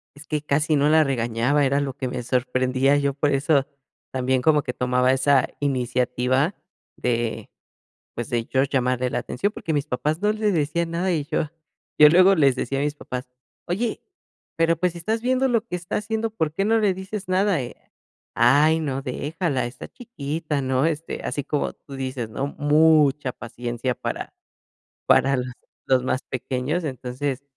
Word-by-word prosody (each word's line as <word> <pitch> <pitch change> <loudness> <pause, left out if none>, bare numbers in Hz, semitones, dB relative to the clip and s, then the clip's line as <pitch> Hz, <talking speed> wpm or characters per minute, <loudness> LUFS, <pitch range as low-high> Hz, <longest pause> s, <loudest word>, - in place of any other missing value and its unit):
Es 145 +1 -14
que 150 -1 -1
casi 150 +1 +1
no 145 +1 +3
la 155 0 +5
regañaba, 125 +2 +1
era 140 +1 +2
lo 140 -2 -2
que 130 -2 -4
me 125 -1 -4
sorprendía. 130 +2 +1
Yo 140 -1 0
por 145 +1 +1
eso 140 0 +2 0.5
también 130 0 0
como 150 +1 +3
que 125 - -4
tomaba 125 0 +2
esa 135 0 +3
iniciativa 125 - 0 0.4
de, 120 -2 -2 0.7
pues 120 - -5
de 120 -1 0
yo 130 0 +1
llamarle 125 -2 0
la - - -1
atención, 200 +11 -2
porque 165 - -4
mis 145 0 0
papás 150 +5 -1
no 210 +1 +3
le 215 -1 0
decían 165 +2 0
nada 180 +2 0
y 150 -4 -1
yo 150 +1 -2 0.5
yo 150 0 +9
luego 185 +4 +6
les 140 -6 +3
decía 135 +2 -2
a 140 - 0
mis 150 0 -1
papás: 125 -3 -6 0.4
"Oye, 215 +6 -2 0.6
pero 165 0 +3
pues 180 +1 0
si 170 - -9
estás 220 +7 -1
viendo 260 +2 +1
lo 230 -2 +1
que 180 - -3
está 175 0 -4
haciendo, 220 +1 -2
¿por 160 -8 -2
qué 195 - 0
no 225 +2 +3
le 205 -3 +2
dices 190 +2 -6
nada?" 185 -1 +2 0.8
"Ay, 145 +7 +4
no, 135 -3 -2
déjala, 145 0 -2
está 120 - -8
chiquita", 150 - -4
¿no? 130 +3 +1
Este, 165 0 -3
así 145 - -3
como 145 +1 -1
tú 140 - -13
dices, 130 -4 -4
¿no? 135 +5 -2
Mucha 150 -3 +4
paciencia 120 +1 -4
para - - -5 0.8
para, 135 +1 +4
los 125 0 -4 0.3
los 130 -1 +3
más 130 - 0
pequeños. 130 +6 -3
Entonces, 130 0 -4
145 Hz, 175 wpm, -23 LUFS, 130-165 Hz, 0.8 s, yo